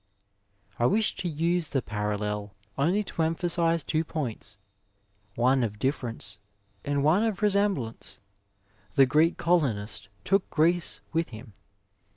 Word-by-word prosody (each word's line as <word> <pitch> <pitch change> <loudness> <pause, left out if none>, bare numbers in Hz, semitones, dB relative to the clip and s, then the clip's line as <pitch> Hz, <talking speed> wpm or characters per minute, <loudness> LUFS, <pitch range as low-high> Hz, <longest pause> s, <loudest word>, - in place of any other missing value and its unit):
'' 100 0 -35
I 120 - +4
wish 215 - +2
to 180 - -2
use 165 +1 0
the 135 - 0
parallel 105 -1 -3 0.2
only 180 +9 +2
to 170 - -4
emphasise 165 0 +1
two 155 +4 0
points, 145 -11 -5 0.8
one 130 +2 +3
of 105 -2 -2
difference 115 -5 -2 0.4
and 145 -1 0
one 160 +7 +4
of 220 -3 -1
resemblance. 195 - 0 0.8
The 135 - +7
Greek 155 +5 +3
colonist 110 - 0
took 195 0 +1
Greece 160 -10 +1
with 165 +1 0
him. 110 -1 -11
140 Hz, 130 wpm, -27 LUFS, 110-170 Hz, 0.8 s, The